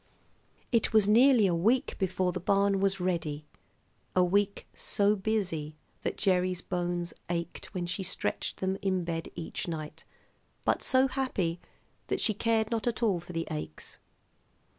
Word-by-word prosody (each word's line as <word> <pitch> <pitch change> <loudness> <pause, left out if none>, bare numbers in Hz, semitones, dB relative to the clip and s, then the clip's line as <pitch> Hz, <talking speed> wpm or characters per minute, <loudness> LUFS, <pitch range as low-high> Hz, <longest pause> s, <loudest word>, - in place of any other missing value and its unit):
It 230 -2 +2
was 215 -2 +5
nearly 235 +1 +6
a 180 - +2
week 220 +10 +2
before 185 -1 +1
the 185 - -4
barn 200 +2 +2
was 195 0 +1
ready, 165 -5 -2 0.7
a 180 - +5
week 200 +3 +1
so 205 +1 +1
busy 190 -7 -2 0.3
that - - -2
Gerry's 185 -2 +1
bones 175 -1 -2 0.2
ached 170 -1 -3
when 180 -1 -1
she 180 +3 -3
stretched 185 - -2
them 190 +1 0
in 185 -2 0
bed 165 -1 -3
each 165 - -5
night, 155 -3 -5 0.6
but - - +2
so 260 +1 +4
happy 205 -11 -1 0.5
that - - -1
she 215 - +2
cared 220 +1 +1
not 230 0 -1
at 235 0 -1
all 200 -6 +3
for 175 +1 -10
the 165 0 -2
aches. 150 - -6
185 Hz, 155 wpm, -30 LUFS, 175-210 Hz, 0.7 s, nearly